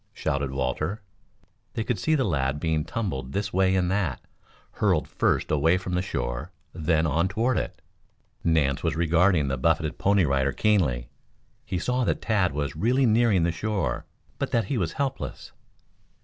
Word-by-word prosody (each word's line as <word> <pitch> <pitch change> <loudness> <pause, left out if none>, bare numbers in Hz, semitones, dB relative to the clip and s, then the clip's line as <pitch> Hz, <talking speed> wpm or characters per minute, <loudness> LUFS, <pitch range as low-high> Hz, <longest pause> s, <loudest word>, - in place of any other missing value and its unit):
shouted 70 -1 -1
Walter. 75 +10 -2 0.7
They 115 - -1
could 115 -3 -2
see 155 +8 +2
the 135 - +2
lad 70 - 0
being 80 -1 0
tumbled 75 - -3
this 100 0 -2
way 95 0 +3
and 90 -1 +1
that, 95 -8 0 0.5
hurled - - +1
first - - 0
away 80 +4 +3
from 90 -1 -5
the 90 - +1
shore, - - -3 0.2
then 80 0 +1
on 80 +4 +2
toward 115 +6 0
it. - - -6 0.6
Nance 70 -5 +2
was 80 -2 0
regarding 85 -1 +3
the 65 -1 -2
buffeted 80 +1 +1
Pony 100 -2 +3
Rider 70 -1 +1
keenly. 70 - +1 0.6
He 95 - -2
saw 125 +7 0
that - - 0
Tad 100 -5 +1
was 70 0 -3
really 125 - +2
nearing 110 -5 +3
the 85 - +2
shore, 100 +2 -2 0.3
but - - -1
that 115 -3 +1
he 125 - -2
was 85 -4 -1
helpless. 135 -1 -4
85 Hz, 165 wpm, -26 LUFS, 75-105 Hz, 0.7 s, way